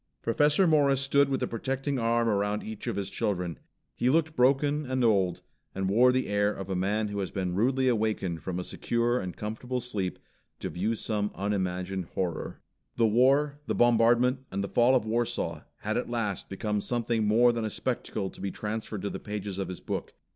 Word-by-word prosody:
Professor 150 +9 +3
Morris 145 -5 +4
stood 140 +1 +3
with 135 - 0
a - - 0
protecting 135 +3 -2
arm 115 0 +2
around 105 0 0
each 110 -1 -7
of - - -1
his 100 -1 -2
children. 90 -4 -2 0.3
He 125 - +1
looked 160 +2 +2
broken 140 +4 +3
and 130 -1 0
old, 100 -6 +2 0.3
and 95 0 -1
wore 120 +6 +5
the 130 +1 +1
air 105 0 +1
of 95 -2 -6
a - - 0
man 105 +4 0
who 100 0 -3
has 95 -3 -2
been 90 -2 -2
rudely 130 +6 +2
wakened 105 -7 -1
from 90 -2 -4
a - - -3
secure 120 +5 0
and 90 -1 -6
comfortable 115 +4 -3
sleep 100 -7 -3 0.4
to - - -5
view 105 +6 -1
some 105 -2 -1
unimagined 95 -2 -2
horror. 90 -4 -3 0.3
The 115 - +3
War, 135 +6 +3
the - - 0
bombardment 120 +2 +4
and 100 +1 -2
the 100 - -4
fall 120 +2 +4
of 125 - +2
Warsaw, 115 +1 -2 0.2
had 110 +1 -1
at 120 - -2
last 115 -5 -2
become 105 +1 -2
something 115 -2 0
more 120 +3 +5
than 115 -1 -2
a 110 - -1
spectacle 95 -2 -3
to - - -13
be 100 - -2
transferred 105 0 -4
to 100 - -2
the - - -5
pages 105 -2 -5
of 95 - -2
his 90 - -7
book. - - -4
110 Hz, 195 wpm, -28 LUFS, 100-125 Hz, 0.4 s, wore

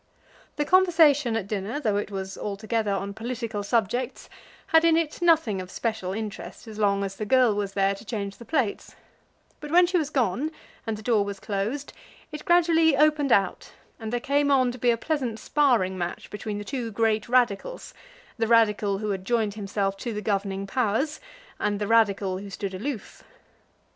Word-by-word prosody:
The 295 - -1
conversation 320 -9 +4
at 215 - -3
dinner, 205 +6 -3
though 215 -8 0
it 205 - -2
was 190 -1 -5
altogether 215 +2 -2
on 195 0 -2
political 230 -1 -4
subjects, 235 +4 -1 0.4
had 320 0 +7
in 330 -1 +5
it 330 0 -2
nothing 320 - +3
of 185 - -9
special 220 -3 -3
interest 215 +2 -6
as 215 -1 -9
long 200 -1 +2
as 195 0 -4
the 215 - -3
girl 255 -2 +4
was 200 -1 -3
there 195 0 +2
to 195 - -10
change 200 -3 -5
the - - -11
plates; 245 -4 -2 0.6
but 300 - -8
when 350 +3 +6
she 360 0 +1
was 300 -3 -2
gone, 260 +1 0 0.4
and 220 -1 -2
the 215 - -11
door 220 -3 +3
was 200 -1 -6
closed, 215 +8 -3 0.4
it 300 0 -8
gradually 330 -4 +4
opened 300 -2 +3
out, 195 -4 +1 0.3
and 220 -1 -5
there 245 - 0
came 285 +3 +1
on 260 -3 +3
to 250 - -10
be 245 - +2
a 235 - +3
pleasant 255 -5 -2
sparring 235 -7 +2
match 175 0 -5
between 210 0 -5
the 205 - -5
two 245 0 -3
great 220 0 0
Radicals, 250 - 0 0.5
the 225 - +1
Radical 210 -3 +3
who 210 +1 -2
had 190 -1 -3
joined 220 -1 0
himself 195 -1 -2
to 235 +3 -4
the 210 - -4
governing 195 -1 -1
powers, 255 +7 0 0.4
and 205 -1 0
the 210 - -1
Radical 200 -4 +2
who 200 0 -8
stood 195 +1 -5
aloof. 220 +3 -6
220 Hz, 185 wpm, -26 LUFS, 200-275 Hz, 0.6 s, had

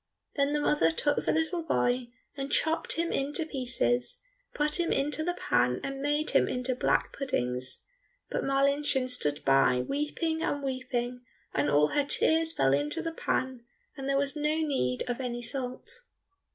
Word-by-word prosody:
Then 280 0 +1
the 295 - +1
mother 290 - +3
took 290 - 0
the - - +1
little 320 +2 0
boy 250 -6 0 0.3
and 275 0 -4
chopped 320 +1 +1
him 335 +1 -1
in 275 +2 -1
pieces, 250 - 0 0.4
put 300 +3 +1
him 340 - +1
into 295 +3 +1
the 350 +2 -1
pan 125 0 +1
and 275 0 -4
made 295 +2 +1
him - - +4
into 250 +1 -1
black 250 - +1
puddings; 125 - -1 0.4
but - - -2
Marlinchen 275 -1 +2
stood 150 - +1
by 135 -2 +4
weeping 320 +3 -1
and 285 -2 -1
weeping, 250 -2 -3 0.3
and 145 +1 +1
all 150 +1 +4
her 290 - +1
tears 320 +3 +2
fell 135 - +2
into 145 +1 -1
the 330 - -2
pan 260 -6 -2 0.3
and 270 0 -5
there 275 - +2
was 280 +1 0
no 300 +1 0
need 265 - 0
of 245 +1 -2
any 240 -1 -4
salt. 265 - -3
275 Hz, 165 wpm, -29 LUFS, 240-295 Hz, 0.4 s, him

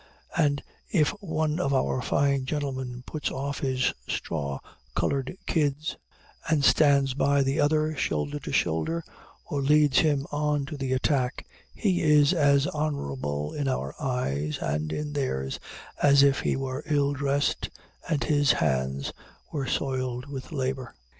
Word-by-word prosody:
And 145 -4 +2 0.3
if 155 -6 +3
one 160 -3 -1
of 140 -6 +1
our 130 -1 +1
fine 140 0 +1
gentlemen 130 -4 -3
puts 155 - -3
off 140 +1 -3
his 130 -2 +1
straw 70 -4 -3 0.4
colored 135 +5 -1
kids 150 -1 0 0.5
and 150 -3 +3
stands 140 -3 +5
by 140 +1 +3
the 135 +4 0
other, 155 +1 +2
shoulder 75 - -1
to - - -6
shoulder, 165 - 0 0.4
or 145 -4 -2
leads 145 0 +4
him 145 -3 +2
on 150 -1 0
to 145 - -6
the 135 -2 -3
attack, 130 -1 0 0.3
he 190 -5 +1
is 150 +1 +5
as 140 -4 +4
honorable 75 - -2
in 145 -2 -2
our 70 - -1
eyes 75 - -1
and 75 +1 -2
in 150 - -3
theirs 65 - -2 0.4
as 140 -1 +6
if 140 0 +4
he - - 0
were 130 +1 -3
ill 145 -2 +2
dressed 140 0 0 0.4
and 145 -6 +1
his 145 +2 +3
hands 65 -1 0 0.4
were 140 -3 -2
soiled 130 -2 -1
with 135 -2 -7
labor. 130 -3 -3
140 Hz, 145 wpm, -27 LUFS, 130-150 Hz, 0.5 s, as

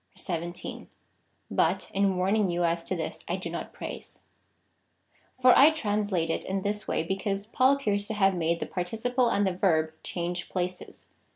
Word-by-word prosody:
1 170 -3 -3
7. - - -7 0.6
But, - - +1
in 195 -1 +2
warning 195 +2 +2
you 175 0 0
as 170 0 +1
to 185 - -2
this, 160 -2 -5
I 175 - 0
do 185 -3 -5
not 170 - -5
praise} - - -8 1.2
For 255 0 +7
I 285 - +8
translate 205 - 0
it - - -2
in 195 0 -2
this 210 0 -2
way, - - 0
because 195 +3 -2
Paul 255 +4 +3
appears 205 -7 0
to 220 - -3
have 195 -2 +4
made 170 -1 0
the - - -2
participle 230 +7 0
and 205 -2 +2
the 190 - +1
verb 160 -4 +2
change 175 0 -4
places. 180 0 -5
190 Hz, 175 wpm, -28 LUFS, 175-210 Hz, 1.2 s, I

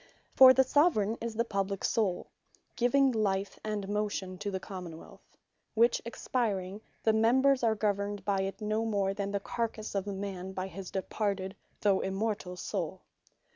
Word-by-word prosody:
For 260 -1 +10
the 265 +1 +5
Soveraign, 250 - +2
is 230 -1 -4
the 235 +1 +1
publique 195 -2 -2
Soule, 195 -6 0 0.4
giving 270 +2 +3
Life 200 -3 -1
and 210 -2 -3
Motion 205 -3 -2
to 205 - -3
the 190 -1 -3
Common 180 -4 -7
wealth; - - -16 0.4
which 235 +2 +4
expiring, 210 -5 -2 0.2
the 220 - +4
Members 255 +5 +4
are 225 -2 +3
governed 205 -1 -1
by 200 -1 +1
it 195 +1 -4
no 215 +1 0
more, 200 -3 0
than 200 0 -3
the 200 - 0
Carcasse 220 +1 -3
of 200 0 -2
a - - -2
man, 190 -1 -5
by 185 0 -3
his 190 0 -7
departed 195 0 -2 0.3
(though 200 -2 +3
Immortal) 195 -2 -2
Soule. 185 -1 -4
205 Hz, 165 wpm, -30 LUFS, 190-225 Hz, 0.4 s, For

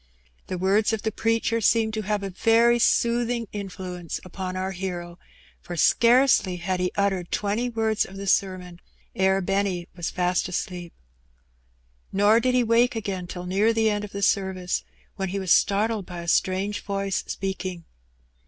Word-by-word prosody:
The 185 - -3
words 200 +5 +2
of 220 - -2
the 220 - 0
preacher 230 +1 0
seemed 220 +1 +2
to 215 - -2
• - - -10
have 210 -1 -1
a 195 - -4
very 230 +5 +4
soothing 235 0 +1
influence 185 -4 -6
upon 185 0 -5
our 190 +1 -2
hero, 175 -2 -5 0.4
for 175 - -7
scarcely 235 -1 +4
had 180 +1 -2
he 180 0 0
uttered 195 -3 0
twenty 210 +4 -1
words 220 -2 0
of 195 - -10
the 200 - -6
sermon 185 -3 0 0.4
ere 190 0 +2
Benny 195 -2 -1
was 175 -2 -3
fast 180 0 0
asleep. 175 -1 -4 1.2
Nor 205 +3 +4
did 255 +1 +1
he 250 - +4
wake 235 +2 +3
again 195 -5 -4
till 180 0 -7
near 200 +5 +2
the 220 -1 +2
end 205 0 -2
of 205 - -7
the 200 0 -4
service, 190 -2 0 0.3
when 190 -2 -2
he 195 - -3
was 190 -3 -2
startled 210 0 +2
by 175 -2 -7
a 170 - -9
strange 190 +4 +1
voice 195 -1 -2
speaking. 190 -3 -4
195 Hz, 170 wpm, -25 LUFS, 185-220 Hz, 1.2 s, very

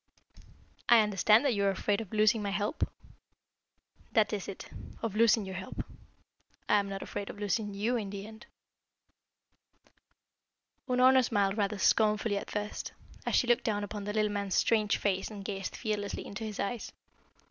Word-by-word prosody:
"I 235 -2 +8
understand 210 +4 +4
that 270 - +3
you 200 -2 0
are 200 - +4
afraid 200 +2 0
of 215 - -9
losing 215 +1 +3
my 205 - -2
help." 205 +7 -1 1.2
"That 220 -1 +3
is 200 -3 -3
it 195 - -7 0.4
of 220 -3 -2
losing 225 -1 +4
your 190 - -6
help. 190 0 -6 0.8
I 210 - +5
am 200 -1 -3
not 195 0 -5
afraid 200 - -5
of - - -8
losing 205 0 -1
you 225 +5 0
in 205 -4 -4
the 200 0 -6
end." 220 0 -12 2.4
Unorna 255 +1 +5
smiled 200 -4 +1
rather 210 -1 0
scornfully 215 +1 +3
at - - -9
first, 210 0 -4 0.3
as - - +2
she - - +4
looked 240 -1 +3
down 205 -2 -1
upon 205 0 -5
the 210 - -3
little 215 -1 +1
man's 200 -2 -2
strange 215 -3 +3
face 190 -2 -1
and 205 -3 -9
gazed 195 -2 -4
fearlessly 210 -3 -3
into 205 +3 -6
his 215 -2 -6
eyes. 230 +2 -3
210 Hz, 170 wpm, -30 LUFS, 200-220 Hz, 2.4 s, I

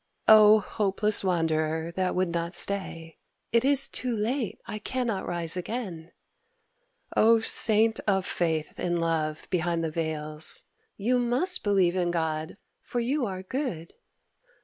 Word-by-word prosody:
O 215 0 +8
hopeless 210 +1 0
wanderer 160 -2 -1
that 185 +1 -2
would 185 -1 0
not 170 +1 -3
stay, 165 -5 -2 0.3
("It 230 +1 +2
is 275 0 +4
too 250 -2 -1
late, 230 +2 -2
I 215 - -6
cannot 235 -3 -3
rise 170 -1 0
again!") 180 -4 -6 1.0
O 230 +1 +5
saint 220 0 +4
of 190 -2 +1
faith 160 -3 -2
in 175 -1 -1
love 160 -2 -2
behind 170 -2 -1
the 160 - -2
veils, 155 -1 -1 0.3
("You 245 +5 +1
must 250 +10 +1
believe 190 -4 +2
in 180 -2 0
God, 160 -1 -3 0.2
for 245 - -5
you 250 +2 -1
are 185 -1 -6
good!") 190 - -5
185 Hz, 135 wpm, -26 LUFS, 165-225 Hz, 1.0 s, O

